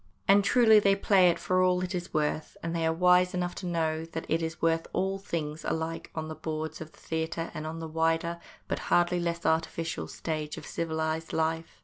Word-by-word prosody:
And 200 +1 +6
truly 220 0 +6
they 200 -1 +4
play 195 -2 +5
it 170 - +1
for 185 0 +1
what 180 - -1
it 185 +2 -3
is 175 0 -4
worth, 155 0 -1
and 165 0 -2
they 165 -1 +1
are - - +3
wise 180 +2 +4
enough 180 0 -1
to 185 - -5
know 160 -2 0
that 165 0 -6
it 165 +1 +1
is 160 0 -4
worth 165 0 +1
all 195 +1 0
things, 160 -5 -4
alike 160 0 -3
on 160 -1 -3
the 160 - -5
boards 155 0 -5
of 155 0 -8
the - - -22
theatre 160 +1 -3
and 155 0 -5
on 160 +1 -5
the 165 0 -5
wider, 165 +1 0 0.3
but - - -2
hardly 175 0 +3
less 170 0 -2
artificial, 165 0 -1
stage 155 -2 -4
of - - -8
civilised 160 0 -2
life. 160 0 -1
165 Hz, 215 wpm, -29 LUFS, 160-180 Hz, 0.3 s, And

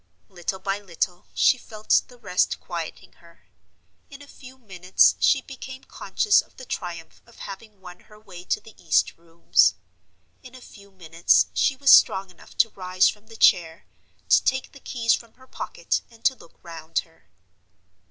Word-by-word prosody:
Little 185 +1 -5
by 195 +1 -3
little 180 -2 -4
she 255 - +3
felt 215 -2 0
the 245 - -17
rest 195 -6 -1
quieting - - -7
her. - - -21 0.6
In 280 0 -12
a - - -16
few 260 -1 -14
minutes 185 -6 +2
she 270 -2 +3
became 265 0 -10
conscious 420 -1 +1
of - - -25
the 255 - -10
triumph 170 -7 -7
of 235 - -20
having 205 +1 -10
won 180 -1 -12
her 210 0 -19
way 185 -5 -12
to - - -1
the 225 - -16
east 165 - +2
rooms. 105 - +2 0.7
In 255 0 -14
a - - -11
few 200 -5 -16
minutes 170 -3 +1
she 270 - +1
was 275 +1 +4
strong 190 -1 +5
enough 180 - -19
to 225 - +4
rise 185 -1 +1
from 210 +1 -10
the 225 0 -13
chair, 165 -5 +3 0.4
to - - +5
take 265 0 -1
the 275 - -15
keys 230 -3 0
from 230 -1 -5
her 260 - -19
pocket, - - -3
and 230 -1 -21
to 265 - +4
look 210 - -19
round 165 -1 -8
her. 165 -1 -29
200 Hz, 175 wpm, -24 LUFS, 175-250 Hz, 0.7 s, strong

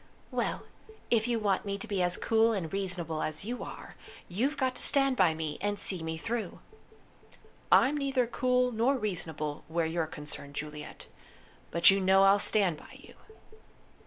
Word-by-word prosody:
"Well, - - -2 0.5
if 230 -1 +2
you 240 -1 +1
want 205 -3 0
me 200 -1 -3
to 225 - -8
be 200 -3 -1
as 175 0 +1
cool 225 0 +2
and 180 -6 -4
reasonable 180 -5 -2
as 155 +5 -4
you 245 +3 -4
are, - - -9 0.3
you've 255 +12 -1
got 260 -2 0
to - - -2
stand 275 -2 +4
by 180 -8 +3
me, 155 -2 -4
and 205 +1 -1
see 185 -4 -1
me 160 0 -4
through." 225 +1 -4 1.1
"I'm 285 +3 +5
neither 270 -3 0
cool 250 +1 +1
nor 240 +4 +1
reasonable 160 - -3
where 165 +1 -1
you're 160 0 -1
concerned, 150 -2 -8
Juliet. 150 0 -7 0.6
But 170 +3 +6
you 195 0 +1
know 190 +1 +5
I'll 195 +1 +5
stand 195 -6 +3
by - - -14
you." - - -15
195 Hz, 170 wpm, -29 LUFS, 160-235 Hz, 1.1 s, But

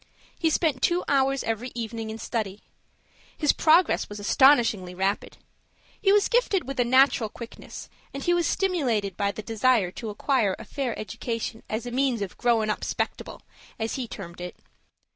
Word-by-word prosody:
He 325 - +2
spent 305 -5 +1
two 350 +5 +2
hours 270 -1 +2
every 225 +3 -3
evening 225 -1 -4
in 220 - -5
study. 215 -4 -4 0.7
His 295 -3 +3
progress 330 +2 +3
was 205 0 -7
astonishingly 215 -5 +4
rapid. 195 +2 -1 0.6
He 390 - +4
was 410 0 +4
gifted 440 - +1
with 275 -1 -5
a - - +5
natural 255 -2 +4
quickness; 235 +2 -10 0.2
and 275 0 -6
he 350 - +2
was 345 -1 +2
stimulated 245 - 0
by 200 +1 0
the 215 - -8
desire 225 -3 +2
to 220 +3 -6
acquire 210 -2 +1
a - - -10
fair 265 -5 -3
education 225 +2 -4
as 220 +3 -3
a 245 - -5
means 250 -4 +1
of 190 - -7
"growin' 225 -3 +2
up - - -4
'spectable," - - -3 0.4
as 225 0 -2
he 255 -3 -3
termed 175 -5 -9
it. 180 0 -6
235 Hz, 170 wpm, -26 LUFS, 210-275 Hz, 0.7 s, a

